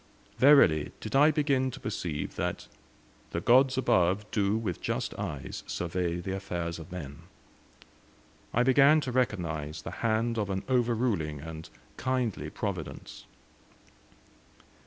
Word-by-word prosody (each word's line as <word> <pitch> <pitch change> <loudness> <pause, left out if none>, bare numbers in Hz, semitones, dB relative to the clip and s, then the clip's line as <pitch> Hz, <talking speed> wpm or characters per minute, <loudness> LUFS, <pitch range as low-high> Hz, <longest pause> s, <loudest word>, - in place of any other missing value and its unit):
Verily 125 - +6
did 110 +3 -5
I 145 +3 +7
begin 140 -4 +1
to - - -8
perceive 85 -8 -4
that - - -3 0.6
"the 85 - -2
Gods 130 +7 +4
above 95 -4 +2
do 100 0 +1
with 105 -6 -3
just - - -2
eyes 70 -3 -5
survey 85 0 -2
the 95 +2 -4
affairs 85 -3 -4
of 80 +3 -11
men." 70 -6 -7 1.3
I 120 - +2
began 140 +4 +6
to 130 - -3
recognize 85 - -2
the - - -6
hand 115 0 +1
of 105 -2 -2
an 95 0 -2
overruling 115 - 0
and 80 0 -8 0.3
kindly 125 -5 -1
Providence. - - -6
105 Hz, 125 wpm, -29 LUFS, 85-125 Hz, 1.3 s, I